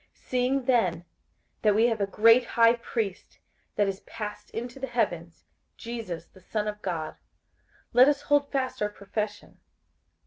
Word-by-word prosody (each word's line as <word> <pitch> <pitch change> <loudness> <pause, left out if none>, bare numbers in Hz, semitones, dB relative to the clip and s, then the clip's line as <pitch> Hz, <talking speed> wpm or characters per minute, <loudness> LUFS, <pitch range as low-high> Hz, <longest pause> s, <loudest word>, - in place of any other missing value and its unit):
58:004:014 - - -29
Seeing 255 +1 +1
then 185 -10 +2 0.6
that 210 -2 +4
we 225 +2 +5
have 225 -3 +1
a 200 - +1
great 230 +5 +6
high 230 0 +4
priest, 225 -4 -4 0.4
that 205 -1 +2
is 195 0 -3
passed 210 -2 -7
into 240 +3 -6
the 265 - -3
heavens, 175 -9 -2 0.3
Jesus 230 -8 -6
the 190 - -20
Son 210 +3 -3
of 210 0 -4
God, 170 -5 -4 0.8
let 250 +3 +8
us 290 0 0
hold 290 -1 +2
fast 260 -4 -2
our 210 - +1
profession. 210 +1 -5
225 Hz, 160 wpm, -27 LUFS, 200-245 Hz, 0.8 s, let